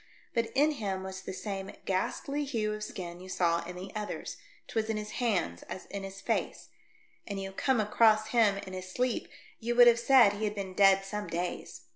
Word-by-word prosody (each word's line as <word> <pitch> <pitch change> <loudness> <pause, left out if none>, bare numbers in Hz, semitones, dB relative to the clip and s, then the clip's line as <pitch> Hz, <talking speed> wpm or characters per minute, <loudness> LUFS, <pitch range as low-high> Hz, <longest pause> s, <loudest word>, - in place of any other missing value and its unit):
But 230 -1 0
in 295 +3 +4
him 195 -9 -3
was 190 0 -6
the 190 - -6
same 195 0 -5
ghastly 275 +9 -1
hue 225 -6 -1
of 215 0 -5
skin 175 -4 -6
you 185 +1 -10
saw 170 -2 +1
in 180 +1 -7
the 185 +2 -7
others; 210 -1 -4 0.3
'twas 225 -1 -1
in 220 - 0
his 210 0 -5
hands 185 - 0
as 185 - -6
in 200 - -4
his 195 0 -8
face; - - -2 0.6
had 200 - -4
you 195 0 -4
come 255 +5 +1
across 215 0 +4
him 220 -4 +4
in 190 - -8
his 185 0 -6
sleep 250 +2 -1 0.3
you 240 +1 -1
would 245 0 +9
have 235 -1 +6
said 235 -4 +6
he 210 +1 -2
had 210 0 -2
been 195 -2 -5
dead 195 0 +5
some 210 +1 -4
days. 175 -9 -4
205 Hz, 205 wpm, -30 LUFS, 190-225 Hz, 0.6 s, would